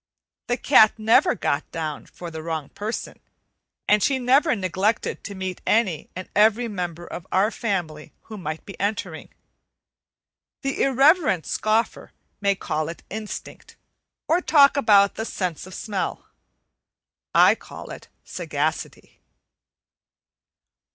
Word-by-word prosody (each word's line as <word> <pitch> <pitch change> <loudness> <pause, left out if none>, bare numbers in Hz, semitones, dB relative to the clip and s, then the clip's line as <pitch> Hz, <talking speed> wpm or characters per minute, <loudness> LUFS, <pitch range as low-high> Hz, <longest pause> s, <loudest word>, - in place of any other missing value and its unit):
The 245 - 0
cat 220 -5 +5
never 220 +1 +4
got 140 - -2
down 155 -3 -5
for 175 -1 -9
the 160 -1 -6
wrong 160 -3 -4
person, 215 +3 -5 0.7
and 210 0 +4
she 270 +6 +2
never 260 +4 +3
neglected 195 +2 -1
to 200 - -7
meet 190 -1 -5
any 210 -8 +1
and 185 +1 -6
every 220 +3 +4
member 175 -5 -5
of 175 +1 -8
our 200 +4 +2
family 175 -11 -3
who 220 - -10
might 160 -5 -6
be 195 - -11
entering. 200 -5 -3 1.3
The 275 0 -2
irreverent 270 - +3
scoffer 215 +2 -1 0.3
may 200 -1 +2
call 155 -4 -3
it 170 - -9
"instinct," 215 +1 -7 0.5
or 335 +4 +2
talk 280 -5 +5
about 205 -7 +5
the 220 - -4
"sense 180 -5 -4
of 185 - -10
smell." 205 -3 -4 1.1
I - - +7
call - - -10
it - - -10 0.2
sagacity. - - -4
200 Hz, 125 wpm, -23 LUFS, 175-230 Hz, 1.3 s, I